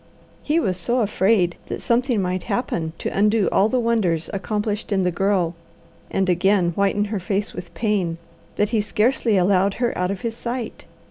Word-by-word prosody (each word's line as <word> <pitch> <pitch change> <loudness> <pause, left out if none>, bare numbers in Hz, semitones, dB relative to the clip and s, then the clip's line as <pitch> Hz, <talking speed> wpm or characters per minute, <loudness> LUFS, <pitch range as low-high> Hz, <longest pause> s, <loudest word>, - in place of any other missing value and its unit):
He 310 +3 +1
was 190 - 0
so 240 +8 +1
afraid 195 -3 +2
that - - -4
something 240 -3 +1
might 180 0 -1
happen 165 -10 -1
to - - -4
undo 210 +1 +3
all 205 +3 +3
the 255 - +1
wonders 215 -9 0
accomplished 210 +2 -2
in 195 -2 +2
the 180 - +1
Girl, 185 -2 +1 0.6
and 190 0 0
again 180 0 +3
whiten 200 +3 +1
her 205 - -1
face 200 +2 -2
with 175 - -8
pain, 195 -7 0 0.4
that 210 - +1
he 225 -3 +1
scarcely 220 +1 +1
allowed 190 +1 +3
her 240 -1 -1
out 180 0 0
of 195 -1 -4
his 230 -1 -3
sight. 235 -1 -5
200 Hz, 180 wpm, -22 LUFS, 185-225 Hz, 0.6 s, undo